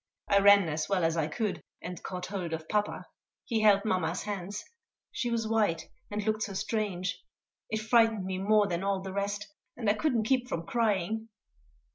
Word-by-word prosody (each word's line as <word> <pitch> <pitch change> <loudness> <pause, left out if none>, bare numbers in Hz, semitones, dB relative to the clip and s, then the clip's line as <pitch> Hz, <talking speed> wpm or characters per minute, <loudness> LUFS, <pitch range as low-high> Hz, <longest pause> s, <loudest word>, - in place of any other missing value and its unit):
I 200 - +5
ran 200 -2 +7
as 155 0 -2
well 190 -3 +2
as 165 0 +2
I 160 -2 +1
could, 205 +6 -2 0.2
and 180 0 -7
caught 180 -1 -5
hold 180 -4 -4
of 160 0 -4
papa. 210 -1 -1 0.4
He 225 -3 0
held 205 -1 +5
mamma's 180 -4 0
hands. 205 0 -4 0.5
She 245 - -2
was 230 -1 0
white, 215 -7 +1 0.2
and 210 0 -2
looked 215 0 0
so 205 -2 -2
strange. 190 -3 -2 0.5
It 220 - -1
frightened 225 -3 +3
me 185 0 -2
more 210 +2 +4
than 175 -1 -2
all 195 -1 0
the 190 0 -6
rest, 200 0 -3 0.2
and 230 -3 -3
I 205 - +5
couldn't 235 0 +1
keep 250 +2 +1
from 165 -6 -3
crying. 220 0 0
200 Hz, 185 wpm, -30 LUFS, 185-220 Hz, 0.5 s, ran